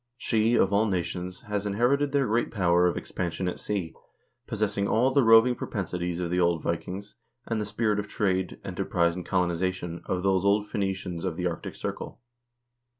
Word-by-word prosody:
She, 115 0 +2
of 95 -3 +3
all 105 +2 +3
nations, 90 -1 -3
has 105 -1 -3
inherited 130 +8 +2
their 140 -1 +2
great 115 +1 +1
power 90 -3 +3
of 90 - -1
ex - - -7
pansion 90 0 -2
at 90 - -3
sea, 95 -6 -3 0.5
possessing 100 -3 0
all 125 +6 +3
the 140 +1 +4
roving 115 +2 +7
propensities 90 -6 -3
of 85 -1 -2
the 90 - +1
old 85 -2 +2
Vi 85 - +1
kings, 95 +5 -8 0.3
and 115 -2 -1
the 105 - -3
spirit 105 0 0
of 105 - -4
trade, 95 -3 -1
enterprise, 85 -1 0
and 90 - -5
colonization 90 -1 -1
of 90 -1 -1
those 95 -1 +2
old 100 +1 +3
Phoenicians 95 -4 -3
of 90 -4 -2
the 90 - -2
arctic 85 -2 -3
circle." - - -5
95 Hz, 185 wpm, -27 LUFS, 90-105 Hz, 0.5 s, roving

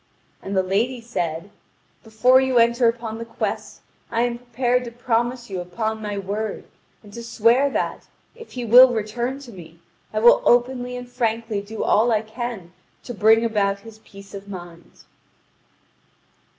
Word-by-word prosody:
And 195 0 -4
the 190 - +3
lady 225 +7 0
said: 185 -6 -4 0.5
"Before 245 +4 +4
you 260 -1 +1
enter 235 +1 +4
upon 230 -1 -5
the - - -4
quest, 230 - -5 0.3
I 230 0 0
am 240 -1 -2
prepared 245 +1 0
to 235 - -7
promise 240 +1 -1
you 185 - -3
upon 220 +5 -4
my 205 -1 -4
word 205 +2 -4 0.4
and 205 -1 -15
to 235 - -7
swear 235 +4 +3
that, - - -3 0.3
if 460 -1 -13
he 245 -2 -4
will 245 +2 +8
return 235 +4 -3
to 255 -4 -11
me, 170 -4 -13 0.3
I 215 - -5
will 235 +2 +6
openly 245 0 +1
and 245 0 -8
frankly 230 -3 -2
do 215 +2 -6
all 230 +3 +3
I 220 -1 +1
can 220 -5 -6 0.3
to 245 - -7
bring 225 +2 +4
about 200 -3 0
his 220 0 -13
peace 195 -2 -15
of 200 0 -9
mind." 175 -3 -11
230 Hz, 165 wpm, -22 LUFS, 205-245 Hz, 0.5 s, will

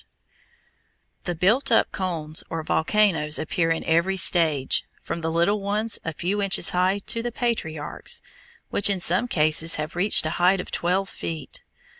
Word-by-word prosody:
POT - - -33
HOLES] - - -40
The 175 - -3
built 230 - +1
up 225 - +3
cones 165 -5 -2
or 165 -1 -4
volcanoes 160 -3 +1
appear 165 +1 -1
in 165 0 -1
every 170 +4 +1
stage, 160 -7 +2 0.2
from 170 - -5
the 165 - -2
little 170 +6 +1
ones 210 +3 -1
a 165 - -3
few 185 +6 -3
inches 195 0 +2
high 185 +2 +1
to 230 - -1
the 240 +1 -4
patriarchs, 160 -12 -3 0.5
which 205 - +3
in 195 -2 0
some 185 +7 +3
cases 155 -3 +2
have 155 +2 -5
reached 180 -1 +4
a 155 - -2
height 185 +2 +4
of - - -7
twelve 185 +3 -1
feet. 160 -5 -7
175 Hz, 170 wpm, -23 LUFS, 160-200 Hz, 0.5 s, reached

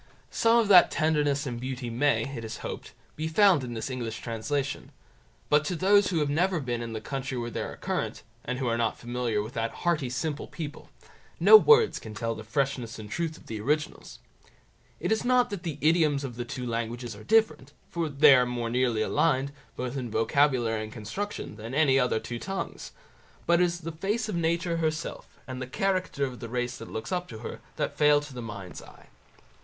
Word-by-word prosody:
Some 230 +1 +4
of 230 -3 +3
that 180 -3 +8
tenderness 150 -2 +1
and 120 -3 -4
beauty 125 -2 -4
may, 140 +5 +2
it 115 - -6
is 110 - -6
hoped, - - -6 0.2
be 155 +1 -3
found 180 -3 +4
in 120 -2 -5
this 110 - -3
English 115 -3 -4
translation; 135 +5 -3 0.6
but 150 0 +4
to 180 - -1
those 200 +3 +4
who 180 - -1
have 150 -2 +1
never 175 +3 +1
been 120 -4 -3
in 115 -1 -5
the 110 - -3
country 135 +2 -4
where 120 0 -3
they - - -3
are - - -5
current, - - -3 0.2
and 125 +1 -3
who 130 - -2
are 115 0 0
not 115 -1 0
familiar 120 -3 -2
with 110 +4 -9
that 115 -2 -1 0.2
hearty 160 -7 +1
simple 145 +4 -3
people, 150 -3 -7 0.5
no - - +9
words 450 +1 +6
can 110 -1 -9
tell 115 +1 -2
the 110 - -8
freshness 130 0 -2
and 105 -1 -9
truth 165 -2 -2
of - - -18
the 110 -2 -5
originals. 150 +6 -2 0.8
It - - -2
is 220 - +1
not 250 -1 +3
that 200 -4 -4
the 160 -5 -4
idioms 155 -3 +3
of 125 -4 -5
the 120 0 -4
two 125 +1 -5
languages 115 0 -3
are 105 - -12
different, 215 - +2 0.2
for 170 -2 -1
they 140 0 +7
are 125 -1 +4
more 120 -1 -3
nearly 120 -3 +1
allied, 140 -1 +1 0.2
both 125 +1 -4
in 125 -3 -3
vocabulary 115 -1 +2
and 110 0 -6
construction, 155 - -5
than 115 +4 -6
any 140 -3 +4
other 125 -3 +1
two 120 +1 -6
tongues, 195 +6 -5 0.5
but 170 +1 +4
it - - +6
is 175 0 -3
the 165 +1 -5
face 205 +8 -2
of 215 - -3
nature 170 +1 0
herself, 160 0 -3
and 130 -1 -6
the 130 - -4
character 185 -1 0
of 125 -2 -7
the 115 - -7
race 125 +1 -2
that 115 - -9
looks 110 +1 -5
up 180 -1 -1
to 110 - -9
her, - - -6 0.2
that - - -3
fail 150 0 +6
to 145 -2 -10
the 125 - -6
mind's 100 -6 -8
eye. - - -16
135 Hz, 210 wpm, -28 LUFS, 120-165 Hz, 0.8 s, no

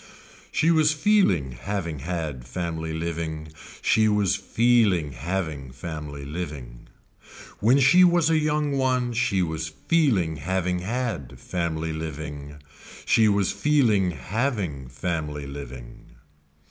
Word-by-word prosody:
She 165 - +3
was 155 -2 +4
feeling 150 - +2
having 85 +4 -4
had 80 -4 -4
family 80 +2 -3
living, 80 -1 -4 0.3
she 110 0 +4
was 105 -2 +2
feeling 105 -6 +2
having 80 -2 -4
family 75 0 -7
living. 70 -7 -7 0.7
When 125 +6 +4
she 160 +8 +6
was 175 -2 +4
a 160 - +4
young 150 -1 0
one 130 -2 +1
she 100 -5 +1
was 80 -1 -3
feeling 95 - +1
having 90 +3 -1
had 105 - -3
family 80 -2 -2
living, 75 -2 -6 0.5
she 110 -1 +4
was 100 -2 +2
feeling 115 -11 +2
having 90 - -2
family 75 0 -3
living. 65 -3 -9
85 Hz, 115 wpm, -25 LUFS, 75-115 Hz, 0.7 s, she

